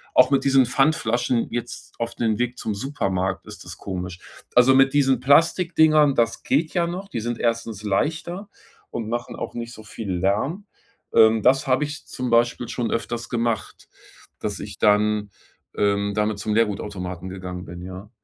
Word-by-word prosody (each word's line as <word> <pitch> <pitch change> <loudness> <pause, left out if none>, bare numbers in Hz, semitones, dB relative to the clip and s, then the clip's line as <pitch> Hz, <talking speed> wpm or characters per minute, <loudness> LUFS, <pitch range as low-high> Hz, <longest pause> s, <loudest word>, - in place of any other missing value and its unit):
auch 130 +2 +6
mit 135 - +3
diesen 135 -1 +5
Pfandflaschen 125 -3 +1
jetzt 120 0 -6
auf 115 0 -3
den 110 -3 0
Weg 125 0 -1
zum 110 - -3
Supermarkt, 95 -6 -2
ist - - -10
das - - -9
komisch. 90 -2 -5 0.4
Also, 125 +2 +7
mit 135 +1 +5
diesen 135 -2 +3
Plastikdingern, 155 0 +4
das 115 -1 +1
geht 155 +4 +1
ja 175 -2 +2
noch. 185 +3 -5
Die 120 - -3
sind 120 +1 -3
erstens 115 -3 -1
leichter 165 - -2 0.4
und 115 -2 -4
machen 120 +1 -3
auch - - -5
nicht 120 0 -6
so 110 - -12
viel 105 -2 -6
Lärm. 105 - -1 0.5
Ähm, 110 0 +6
das 135 +2 +4
habe 130 +3 +2
ich 150 0 -8
zum 125 -1 -4
Beispiel 120 0 +2
schon 120 -2 -2
öfters 115 +1 -3
gemacht, 115 -2 -2 0.5
dass - - -4
ich - - -8
dann, 105 0 +3 0.5
ähm, 100 0 +1
damit 105 -1 0
zum 105 +1 -2
Leergutautomaten 95 -4 -2
gegangen 90 -1 -6
bin, 85 0 -9
ja. 95 +3 -9
115 Hz, 170 wpm, -23 LUFS, 105-135 Hz, 0.5 s, Also